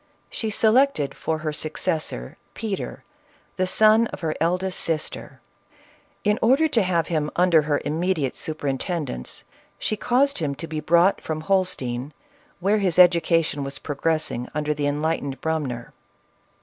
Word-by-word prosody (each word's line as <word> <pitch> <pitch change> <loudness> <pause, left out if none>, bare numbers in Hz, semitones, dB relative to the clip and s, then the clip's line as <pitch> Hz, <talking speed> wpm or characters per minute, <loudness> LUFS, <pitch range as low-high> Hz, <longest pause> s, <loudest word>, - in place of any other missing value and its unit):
She 220 - -3
selected 220 - +3
for 160 - -2
her 155 - -1
successor, 155 - -2 0.2
Peter, 205 -4 -4 0.5
the 185 0 +1
son 220 +4 +5
of - - -9
her 160 -2 -1
eldest 180 +3 0
sister. 160 -2 -3 0.8
In 210 0 +2
order 270 +8 +4
to 235 -6 +3
have 175 -4 +1
him 155 -3 0
under 175 -3 +5
her 150 -1 0
immediate 160 -3 -1
su 155 - -3
perintendence, 145 - -3 0.3
she 215 - -1
caused 260 +5 +1
him 145 -4 -2
to 165 - -6
be 160 -1 -4
brought 170 +5 +3
from 155 -1 -4
Holstein, 150 -8 -1 0.5
where 200 +4 +2
his 185 -4 0
education 170 -4 +4
was 135 0 -5
progressing 150 -4 -2
under 150 0 0
the 145 -1 -1
enlightened 145 -2 -1
Brumner. 140 -7 -3
165 Hz, 140 wpm, -24 LUFS, 150-190 Hz, 0.8 s, son